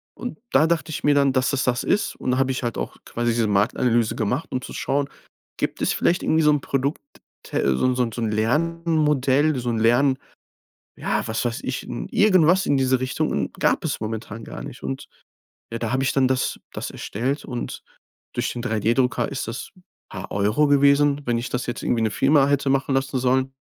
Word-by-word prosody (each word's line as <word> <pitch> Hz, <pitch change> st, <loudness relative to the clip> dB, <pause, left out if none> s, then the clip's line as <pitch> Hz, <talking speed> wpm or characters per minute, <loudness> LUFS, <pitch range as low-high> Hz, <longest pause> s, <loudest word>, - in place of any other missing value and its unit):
Und 245 Hz, -, -6 dB
da 160 Hz, -, +5 dB
dachte 165 Hz, -1 st, -1 dB
ich -, -, -5 dB
mir 145 Hz, -1 st, +4 dB
dann, 140 Hz, -1 st, +3 dB
dass 130 Hz, +1 st, +1 dB
es 130 Hz, -, +1 dB
das 125 Hz, -1 st, 0 dB
ist. 210 Hz, -, 0 dB
Und 125 Hz, -, -2 dB
da 130 Hz, -, +1 dB
habe 135 Hz, 0 st, +2 dB
ich 130 Hz, -, -3 dB
halt 120 Hz, -2 st, -3 dB
auch -, -, -4 dB
quasi 120 Hz, 0 st, -1 dB
diese 115 Hz, -1 st, +1 dB
Marktanalyse 110 Hz, +3 st, +2 dB
gemacht, 125 Hz, +9 st, -1 dB
um 125 Hz, -, -2 dB
zu -, -, -9 dB
schauen, 140 Hz, +1 st, -1 dB, 0.5 s
gibt -, -, -2 dB
es -, -, +2 dB
vielleicht 175 Hz, -, +1 dB
irgendwie 160 Hz, 0 st, +2 dB
so 150 Hz, -, +5 dB
'n 145 Hz, -2 st, +1 dB
Produkt, 140 Hz, +2 st, -1 dB, 0.4 s
te 70 Hz, -1 st, 0 dB
so -, -, -1 dB
'n 130 Hz, -, +2 dB
so 125 Hz, -, +2 dB
'n 115 Hz, -, -3 dB
so 120 Hz, -, -5 dB
'n 110 Hz, -, 0 dB
Lernmodell, 150 Hz, +2 st, +1 dB
so 120 Hz, 0 st, -2 dB
'n 115 Hz, -2 st, 0 dB
Lern 130 Hz, +4 st, +3 dB, 0.8 s
Ja, -, -, -1 dB
was 110 Hz, +2 st, -1 dB
weiß 120 Hz, -1 st, -2 dB
ich, -, -, -3 dB
n -, -, -6 dB
irgendwas 185 Hz, -3 st, +4 dB
in 145 Hz, -, +3 dB
dieser 130 Hz, -1 st, +2 dB
Richtung. 130 Hz, 0 st, -1 dB
Und -, -, -2 dB
gab -, -, +1 dB
es -, -, -2 dB
momentan 110 Hz, 0 st, -5 dB
gar -, -, -8 dB
nicht. -, -, -9 dB
Und 65 Hz, 0 st, -4 dB, 0.6 s
ja, 115 Hz, -, -4 dB
da 115 Hz, 0 st, -2 dB
habe 130 Hz, -, +1 dB
ich 130 Hz, -, +1 dB
dann 135 Hz, -1 st, +4 dB
das 130 Hz, -1 st, 0 dB
das -, -, -5 dB
erstellt 130 Hz, +8 st, -3 dB
und 120 Hz, -3 st, -5 dB, 0.5 s
durch 120 Hz, +1 st, -1 dB
den 120 Hz, -, -5 dB
3D-Drucker 120 Hz, +4 st, +1 dB
ist 140 Hz, -, -4 dB
das 115 Hz, -, -6 dB, 0.4 s
paar 95 Hz, -1 st, -7 dB
Euro 105 Hz, +9 st, +2 dB
gewesen. 140 Hz, 0 st, +4 dB
Wenn 120 Hz, -1 st, +1 dB
ich 120 Hz, -, -4 dB
das 125 Hz, 0 st, -2 dB
jetzt 120 Hz, -, -4 dB
irgendwie 120 Hz, -, +1 dB
'ne 110 Hz, -, +1 dB
Firma 140 Hz, +4 st, +4 dB
hätte 140 Hz, -1 st, +1 dB
machen 135 Hz, 0 st, +1 dB
lassen 135 Hz, 0 st, 0 dB
sollen, 130 Hz, +1 st, +1 dB
130 Hz, 215 wpm, -23 LUFS, 115-145 Hz, 0.8 s, da